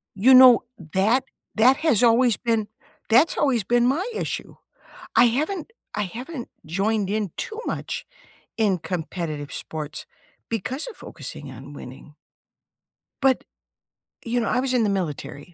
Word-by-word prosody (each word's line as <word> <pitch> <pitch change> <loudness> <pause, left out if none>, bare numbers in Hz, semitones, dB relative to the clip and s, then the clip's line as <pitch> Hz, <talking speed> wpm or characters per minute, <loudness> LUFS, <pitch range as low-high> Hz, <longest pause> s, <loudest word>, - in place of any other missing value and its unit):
You 240 +7 +6
know, 255 -2 +9 0.3
that 220 +7 +3 0.3
that 250 +5 +5
has 305 -10 +2
always 240 0 +5
been 225 -3 0 0.4
that's 250 +9 +5
always 255 -8 +2
been 240 +4 +3
my 300 - +1
issue. - - -4 0.6
I - - +7
haven't 305 - -1 0.2
I 210 - -1
haven't 245 - -7 0.2
joined 195 +5 0
in 210 -3 -1
too 440 +1 -5
much - - -4 0.5
in 205 -5 +2
competitive 165 -3 -4
sports 155 -1 -6 0.4
because 250 - -3
of - - -8
focusing 140 -2 -9
on 135 +3 -11
winning 140 +2 -11 1.1
but, 270 -1 +3 0.8
you 240 +1 0
know, 230 - -1
I 250 - +1
was 260 -1 -1
in 245 -2 +3
the 210 - +2
military 175 -4 -4
225 Hz, 140 wpm, -24 LUFS, 180-255 Hz, 1.1 s, know